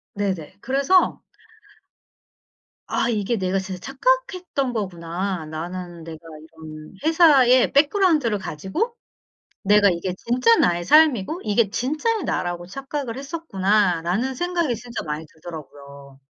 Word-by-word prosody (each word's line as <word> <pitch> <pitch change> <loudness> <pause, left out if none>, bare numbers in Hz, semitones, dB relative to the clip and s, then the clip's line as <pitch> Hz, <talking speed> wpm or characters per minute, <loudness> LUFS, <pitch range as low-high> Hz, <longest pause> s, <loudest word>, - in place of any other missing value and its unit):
네네. 190 -4 -3
그래서 275 +8 +2 1.7
'아 - - 0
이게 220 0 -1
내가 190 0 0
진짜 190 -1 -6
착각했던 360 - -1
거구나. 180 -3 -3
나는 170 +2 -7
내가 160 -1 -8 0.2
이런 155 -1 -12
회사의 290 -6 +5
백그라운드를 295 - +3
가지고 195 - -3 0.7
내가 205 0 +5
이게 180 +1 -2
진짜 235 +3 +2
나의 175 0 +2
삶이고 305 - +4
이게 210 0 +2
진짜의 310 - -1
나라고 175 0 -2
착각을 270 +3 -5
했었구나.'라는 210 - 0
생각이 340 -4 -1
진짜 240 +1 -7
많이 150 +1 -5
들더라고요. 140 -4 -12
210 Hz, 285 characters per minute, -22 LUFS, 175-275 Hz, 1.7 s, 회사의